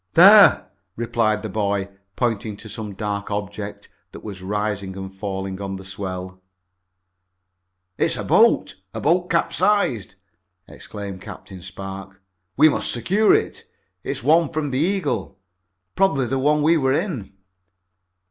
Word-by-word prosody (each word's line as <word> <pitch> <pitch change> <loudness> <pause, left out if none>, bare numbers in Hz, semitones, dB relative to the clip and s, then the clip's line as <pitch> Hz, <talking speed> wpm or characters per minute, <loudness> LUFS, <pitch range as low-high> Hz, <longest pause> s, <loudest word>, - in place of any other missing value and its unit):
"There," 200 +4 +8 0.3
replied 115 -2 0
the 110 - -4
boy, 100 -1 -1 0.3
pointing 110 -4 -2
to 110 - -10
some 105 -2 -7
dark 100 0 -4
object 100 0 -5 0.3
that - - -11
was 100 -3 -7
rising 100 -1 -3
and 95 0 -7
falling 95 -1 -5
on 95 -1 -4
the 95 0 -9
swell. 95 -1 -6 1.6
"It's - - +2
a - - -4
boat! - - +3 0.2
A - - -3
boat 175 +3 +1
capsized!" 170 - +1 0.5
exclaimed 100 -3 -8
Captain 95 -1 -10
Spark. 95 +1 -8 0.4
"We 155 - +7
must 155 - +1
secure 195 - +2
it. - - -2 0.4
It's - - -3
one 160 +2 +4
from 155 -3 -3
the 130 - -1
Eagle. 165 - -1 0.6
Probably 160 -9 +2
the 130 +3 -1
one 150 +2 +2
we 165 +2 +4
were 135 -3 +1
in." 140 - -3
105 Hz, 135 wpm, -22 LUFS, 95-145 Hz, 1.6 s, There